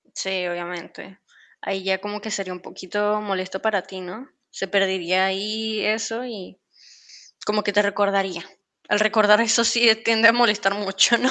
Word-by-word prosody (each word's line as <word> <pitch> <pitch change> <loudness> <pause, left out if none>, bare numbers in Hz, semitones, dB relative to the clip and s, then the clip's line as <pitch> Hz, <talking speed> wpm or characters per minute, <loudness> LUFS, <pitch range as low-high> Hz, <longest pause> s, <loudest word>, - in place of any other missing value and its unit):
Sí, 190 -2 -3
obviamente. 175 +2 -8 0.4
Ahí 190 -1 -4
ya 190 0 0
como 205 +1 -7
que 220 - -7
sería 195 -2 -4
un 180 - -9
poquito 210 +4 -3
molesto 190 -2 -4
para 210 -4 0
ti, 190 0 -11
¿no?, 185 +9 -10 0.2
se 195 - -5
perdería 190 -1 +1
ahí 215 +3 -3
eso 225 +2 -2
y 205 -6 -10 0.9
como 210 0 0
que 205 - -2
te 205 +1 +4
recordaría. 200 -3 -1 0.4
Al 210 - +2
recordar 215 0 +4
eso 230 0 +3
sí 235 +1 +4 0.2
tiende 230 0 +5
a - - +8
molestar 210 -5 +2
mucho, 200 +3 +3
¿no? 260 - +1
200 Hz, 165 wpm, -22 LUFS, 190-220 Hz, 0.9 s, a